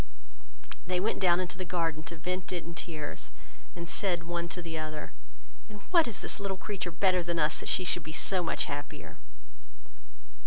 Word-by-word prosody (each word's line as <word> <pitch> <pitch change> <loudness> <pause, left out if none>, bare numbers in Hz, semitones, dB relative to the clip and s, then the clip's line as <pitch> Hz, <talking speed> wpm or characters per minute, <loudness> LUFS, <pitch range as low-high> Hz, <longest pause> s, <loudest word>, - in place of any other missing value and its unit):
They 180 -1 +2
went 210 +5 +1
down 175 -2 +5
into 185 0 -2
the - - 0
garden 165 -2 +1
to 170 - -6
vent 180 +3 -2
it 175 -2 -1
in 170 - -6
tears; 155 -3 -4 0.5
and 170 -1 -5
said 175 -1 +2
one 170 0 -2
to 180 - -4
the 165 -2 -4
other, 155 -1 -3 0.6
"In 215 - -8 0.2
what 340 -6 +7
is 230 - -1
this - - +1
little 195 -1 -1
creature 195 -2 -2
better 185 +2 +4
than 170 0 -1
us, 150 -1 +3
that - - -3
she 185 - +3
should 175 0 +2
be 155 - -6
so 185 +3 +2
much 165 - +1
happier?" 145 +1 -5
175 Hz, 190 wpm, -31 LUFS, 165-185 Hz, 0.6 s, what